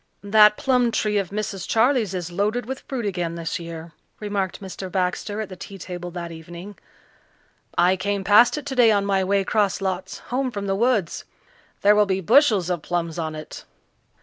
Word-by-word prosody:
"That 210 +1 +6
plum 250 -2 +2
tree 210 -2 0
of 190 -3 -3
Mrs. 200 -2 -4
Charley's 225 -4 +2
is 175 -1 -4
loaded 210 +6 -1
with 265 +3 -5
fruit 250 -5 -3
again 175 -4 -2
this 165 0 -4
year," 165 -1 -8 0.3
remarked 205 -3 -3
Mr. 190 -1 -7
Baxter 190 +3 -2
at 210 - -6
the 185 - -8
tea 195 +2 -10
table 175 -1 -7
that 170 -1 -6
evening. 170 +5 -10 1.0
"I 180 +2 +4
came 200 +1 -2
past 210 +8 +5
it 295 - -6
today 255 -5 +4
on 200 -1 +2
my 195 -1 +1
way 195 +1 +1
'cross 205 0 +1
lots 190 -1 -3 0.2
home 260 +1 0
from 200 -4 -5
the 195 - 0
woods. 215 -4 0 0.6
There 205 - +6
will 210 -1 +4
be 190 -1 0
bushels 215 - +4
of 175 -3 -2
plums 170 0 -3
on 160 -1 -3
it." 155 - -9
195 Hz, 185 wpm, -23 LUFS, 180-215 Hz, 1.0 s, That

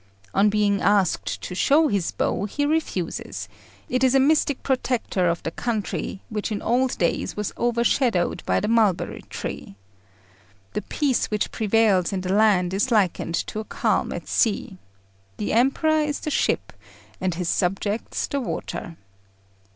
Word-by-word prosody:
On 200 +2 +4
being 205 -1 +2
asked 200 -4 +1
to - - -5
show 290 - +4
his 200 - 0
bow, - - -1
he 290 +8 -1
refuses; 295 - -2 0.4
it 255 +1 0
is 260 0 +4
a - - +6
mystic 285 0 +2
protector 250 -8 0
of 170 - -2
the 160 - -3
country, 215 -2 -3
which 215 0 -3
in 205 - -1
old 250 +2 +1
days 170 +3 -1
was 210 -1 -3
overshadowed 235 -4 +1
by - - +2
the 210 - -2
mulberry 220 -5 +1
tree. - - -6 1.0
The - - -1
peace 280 0 0
which 210 -1 -1
prevails 215 -4 +2
in 190 -2 -2
the 185 +1 -1
land 195 -4 +3
is 205 +7 +1
likened 195 -6 +1
to 215 - -5
a - - -3
calm - - 0
at - - -6
sea. 200 -4 0 0.6
The 210 - -2
Emperor 275 +7 +3
is 295 -1 -2
the 305 - -3
ship, - - 0 0.5
and 185 -2 0
his 180 0 -3
subjects 195 +5 -1
the 280 - -2
water. 170 -7 -5
210 Hz, 155 wpm, -24 LUFS, 190-255 Hz, 1.0 s, a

